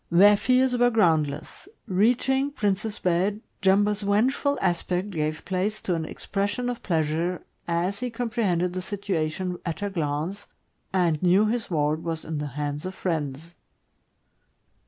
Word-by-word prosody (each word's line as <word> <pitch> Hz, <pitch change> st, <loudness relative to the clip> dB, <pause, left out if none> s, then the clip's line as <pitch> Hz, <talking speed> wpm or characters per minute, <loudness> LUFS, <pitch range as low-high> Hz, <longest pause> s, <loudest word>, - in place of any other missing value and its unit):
Their 200 Hz, +5 st, +7 dB
fears 255 Hz, +3 st, +3 dB
were 245 Hz, 0 st, +4 dB
groundless. 160 Hz, -, +1 dB, 0.2 s
Reaching 245 Hz, +7 st, +2 dB
Prince's 205 Hz, -4 st, -1 dB
bed, 185 Hz, +4 st, +1 dB, 0.2 s
Jumbo's 205 Hz, +2 st, +3 dB
vengeful 245 Hz, +8 st, +2 dB
aspect 180 Hz, +2 st, 0 dB
gave 155 Hz, -2 st, -2 dB
place 195 Hz, +3 st, -1 dB
to 180 Hz, -, -1 dB
an 165 Hz, -2 st, -1 dB
expression 205 Hz, +9 st, -2 dB
of 245 Hz, -, -7 dB
pleasure, 165 Hz, +1 st, -1 dB, 0.2 s
as 175 Hz, +4 st, 0 dB
he 250 Hz, 0 st, -2 dB
comprehended 220 Hz, -7 st, 0 dB
the 185 Hz, -, -2 dB
situa 185 Hz, -5 st, -2 dB
tion 180 Hz, +1 st, -4 dB
at 170 Hz, +4 st, -4 dB
a 200 Hz, -, -2 dB
glance, 165 Hz, +3 st, -2 dB, 0.4 s
and 175 Hz, -5 st, +1 dB
knew 185 Hz, +4 st, +5 dB
his 230 Hz, +1 st, -1 dB
ward 155 Hz, -1 st, 0 dB
was 165 Hz, -1 st, -3 dB
in 155 Hz, -2 st, -3 dB
the 150 Hz, -, -3 dB
hands 145 Hz, +3 st, -3 dB
of 190 Hz, -, -7 dB
friends. 160 Hz, -2 st, -3 dB
185 Hz, 145 wpm, -26 LUFS, 165-210 Hz, 0.4 s, Their